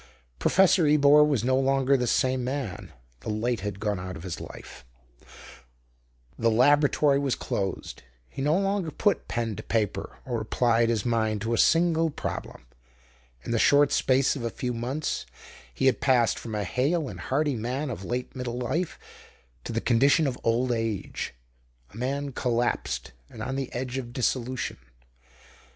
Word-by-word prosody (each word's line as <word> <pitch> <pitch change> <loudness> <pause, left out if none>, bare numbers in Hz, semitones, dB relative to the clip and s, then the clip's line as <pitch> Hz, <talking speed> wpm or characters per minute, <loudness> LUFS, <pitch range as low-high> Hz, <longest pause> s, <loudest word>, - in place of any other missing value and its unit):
Professor 185 -3 +4
Ebor 150 0 +6
was 145 -7 +1
no 130 +1 +2
longer 135 0 +2
the 125 -2 0
same 130 +1 +1
man. 130 -5 -4 0.3
The - - -7
light 115 +2 -1
had 100 0 -5
gone 105 -3 -1
out 90 0 -6
of 80 - -10
his 90 -3 -5
life; - - -10 1.6
the 115 - +3
laboratory 145 +4 +4
was 140 -3 0
closed; 95 -1 -4 0.3
he 135 - -7
no 150 +5 +2
longer 195 -3 0
put 200 +5 0
pen 115 -2 -2
to - - -5
paper 110 -3 -2
or 120 -3 -2
applied 115 +1 +2
his 110 -4 0
mind 110 -3 0
to 115 +2 -1
a - - +1
single 165 -1 +3
problem. 105 - -6 0.8
In - - -5
the 115 - +1
short 145 +3 +5
space 135 +2 +2
of 135 - -5
a 115 - -1
few 125 +2 -3
months 125 +6 -3 0.4
he - - -2
had 130 -3 +3
passed 125 -4 +3
from 110 -2 -6
a 105 - -1
hale 140 - 0
and - - -8
hearty 145 +1 0
man 125 +5 -3
of 105 - -6
late 125 +6 -4
middle 125 -2 -4
life 160 +8 -2 0.7
to - - -4
the 115 0 -1
condition 140 +6 +4
of 135 -3 -1
old 120 +2 +1
age 115 - -3 0.6
a - - -11
man 140 +3 -2
collapsed 120 - -1 0.2
and 110 - -8
on 130 +3 -3
the 135 -2 -3
edge 130 +1 -3
of 120 -2 -8
dissolution. 130 0 -1
125 Hz, 165 wpm, -26 LUFS, 115-140 Hz, 1.6 s, Ebor